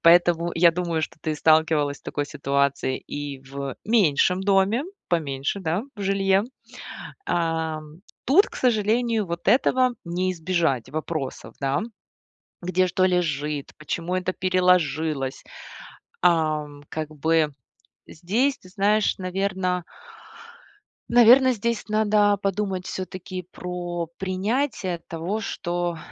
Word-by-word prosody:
Поэтому 170 Hz, 0 st, +5 dB
я 170 Hz, +1 st, +6 dB
думаю, 170 Hz, -2 st, -1 dB
что -, -, -4 dB
ты 155 Hz, -1 st, -2 dB
сталкивалась 155 Hz, -2 st, +3 dB
с -, -, -31 dB
такой 145 Hz, -1 st, -3 dB
ситуацией 140 Hz, -2 st, 0 dB
и 145 Hz, -1 st, -5 dB
в 135 Hz, 0 st, -6 dB
меньшем 185 Hz, -4 st, +3 dB
доме, 200 Hz, +5 st, +3 dB, 0.3 s
поменьше, 145 Hz, +1 st, -1 dB
да, 175 Hz, +3 st, -1 dB
в -, -, -9 dB
жилье. 195 Hz, 0 st, +2 dB, 0.8 s
Ам, 160 Hz, -1 st, -2 dB, 0.2 s
тут, 350 Hz, -, +5 dB
к -, -, -15 dB
сожалению, 225 Hz, -1 st, +1 dB
вот 170 Hz, 0 st, -4 dB
этого 255 Hz, 0 st, +3 dB
не 180 Hz, +2 st, -1 dB
избежать 165 Hz, -7 st, 0 dB
вопросов, 155 Hz, -3 st, -4 dB
да: 135 Hz, 0 st, +1 dB, 0.8 s
где 185 Hz, +1 st, +1 dB
что 185 Hz, +1 st, +2 dB
лежит, 150 Hz, -5 st, -1 dB
почему 170 Hz, +4 st, -3 dB
это 185 Hz, 0 st, -1 dB
переложилось. 170 Hz, -7 st, +1 dB, 0.8 s
Ам, 155 Hz, -4 st, +1 dB
как 155 Hz, -1 st, -3 dB
бы 155 Hz, 0 st, +1 dB, 0.5 s
здесь, 230 Hz, -, 0 dB
ты 185 Hz, -, -16 dB
знаешь, 205 Hz, +3 st, +2 dB
наверно 185 Hz, -1 st, -1 dB, 1.3 s
наверно, 245 Hz, +2 st, +7 dB
здесь 230 Hz, 0 st, -2 dB
надо 210 Hz, -1 st, +3 dB
подумать 195 Hz, -2 st, -2 dB
всё-таки 185 Hz, -1 st, -6 dB
про 175 Hz, -1 st, -4 dB
принятие 195 Hz, +1 st, -1 dB
того, 170 Hz, +6 st, -3 dB
что, 175 Hz, -4 st, -3 dB
180 Hz, 115 wpm, -24 LUFS, 155-195 Hz, 1.3 s, наверно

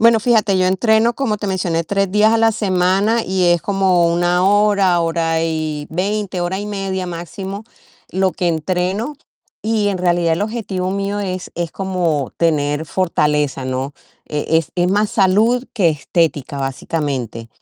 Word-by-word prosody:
Bueno, 230 Hz, 0 st, +5 dB
fíjate, 215 Hz, -4 st, +2 dB
yo 185 Hz, 0 st, +2 dB
entreno, 220 Hz, +4 st, +3 dB
como 220 Hz, -7 st, -1 dB
te 205 Hz, -, -3 dB
mencioné, 175 Hz, -3 st, 0 dB
3 195 Hz, +3 st, 0 dB
días 215 Hz, +2 st, +4 dB
a 230 Hz, -, +3 dB
la 225 Hz, 0 st, +4 dB
semana 195 Hz, +3 st, +1 dB
y 185 Hz, -1 st, +1 dB
es 175 Hz, -1 st, +3 dB
como 190 Hz, -2 st, +2 dB
1 175 Hz, +1 st, +2 dB
hora, 200 Hz, -3 st, +3 dB
hora 165 Hz, -1 st, 0 dB
y 155 Hz, -2 st, -3 dB
20, 195 Hz, +1 st, -2 dB
hora 185 Hz, +3 st, -2 dB
y 205 Hz, -, -5 dB
media 195 Hz, -2 st, -3 dB
máximo 190 Hz, +4 st, -6 dB, 0.5 s
lo 190 Hz, 0 st, +2 dB
que 175 Hz, -, -3 dB
entreno. 185 Hz, -, -1 dB, 0.4 s
Y 215 Hz, -2 st, 0 dB
en 190 Hz, -2 st, -1 dB
realidad 175 Hz, -2 st, +2 dB
el 200 Hz, -, -2 dB
objetivo 200 Hz, -4 st, -3 dB
mío 200 Hz, +1 st, -2 dB
es 185 Hz, -2 st, -4 dB
es 170 Hz, -2 st, -3 dB
como 175 Hz, -8 st, -1 dB
tener 150 Hz, -2 st, 0 dB
fortaleza, 150 Hz, -6 st, 0 dB
¿no? 130 Hz, +2 st, -3 dB, 0.3 s
E-es 160 Hz, +1 st, 0 dB
es 175 Hz, 0 st, +2 dB
más 205 Hz, +2 st, +1 dB
salud 220 Hz, +6 st, +2 dB
que 195 Hz, -8 st, +3 dB
estética, 150 Hz, -2 st, -1 dB
básicamente. 135 Hz, -4 st, -3 dB
185 Hz, 155 wpm, -18 LUFS, 165-205 Hz, 0.5 s, Bueno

